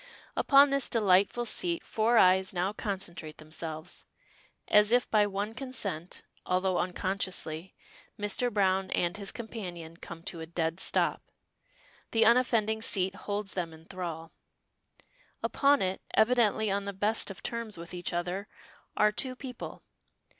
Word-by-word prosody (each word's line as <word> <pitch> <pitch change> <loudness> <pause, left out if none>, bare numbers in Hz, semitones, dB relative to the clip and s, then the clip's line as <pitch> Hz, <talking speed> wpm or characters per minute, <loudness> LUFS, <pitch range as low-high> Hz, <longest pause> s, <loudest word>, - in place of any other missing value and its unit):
Upon 280 0 +6
this 275 -2 +2
delightful 205 +2 +3
seat 340 +8 -1
four 230 +2 +2
eyes 190 -1 +5
now 185 +3 0
concentrate 180 -7 -4
themselves. 155 +1 -6 0.6
As 210 +1 +5
if 245 -1 +4
by 210 -1 +4
one 205 +2 -3
consent, 220 - -4 0.2
although 185 0 +1
unconsciously, 185 -2 -2 0.4
Mr. 205 +4 0
Browne 190 -2 +2
and 175 +1 0
his 200 -2 -4
companion 175 -8 -7
come 170 -1 -9
to 170 - -5
a 160 - -6
dead 165 0 -2
stop. - - +1 0.9
The 225 -1 +5
unoffending 225 -2 +3
seat 190 -3 +2
holds 205 0 -4
them 170 -3 -3
in 160 0 -15
thrall. 170 -3 -6 1.1
Upon 280 -3 +3
it, 185 0 -2
evidently 220 -2 +3
on 200 0 -1
the 200 - -4
best 210 +4 +1
of 195 - -9
terms 230 -4 -4
with 170 +1 -9
each 175 -1 -3
other, 180 +4 -3 0.5
are 210 0 +5
two 255 +4 -2
people. 250 -2 -8
195 Hz, 140 wpm, -30 LUFS, 175-220 Hz, 1.1 s, Upon